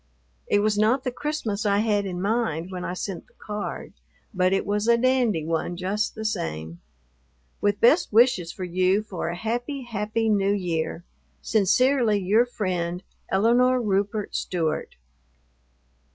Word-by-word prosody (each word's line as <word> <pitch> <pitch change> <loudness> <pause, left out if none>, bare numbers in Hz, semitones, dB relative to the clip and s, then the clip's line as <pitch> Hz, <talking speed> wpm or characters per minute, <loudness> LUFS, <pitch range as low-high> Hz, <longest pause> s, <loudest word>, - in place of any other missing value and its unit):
It 205 - +3
was 210 0 +1
not 235 +5 +3
the 255 - -2
Christmas 245 -7 -3
I 200 -1 +2
had 205 -2 +1
in 180 -1 -4
mind 195 -6 -1
when 180 -1 -5
I 180 - -3
sent 185 -1 -5
the - - -30
card, 210 -1 -6 0.4
but 185 -1 +2
it 195 - +1
was 205 +2 -1
a 235 0 +5
dandy 240 -9 +2
one, 165 +2 -2
just 200 +4 -2
the 220 0 -6
same. 80 - -4 0.8
With 205 0 +1
best 270 +9 +4
wishes 220 -7 +4
for 185 - -7
you 185 +3 +1
for 185 -5 -4
a 170 - -3
happy, 240 +7 -3
happy 225 -1 -2
New 200 -2 +2
Year, 170 -3 -2 0.4
Sincerely 225 +2 +3
your 210 +5 +3
friend, 180 -5 -3 0.3
ELINORE 245 +5 +3
RUPERT 205 -1 -1
STEWART. 160 -3 -2
205 Hz, 150 wpm, -25 LUFS, 185-230 Hz, 0.8 s, a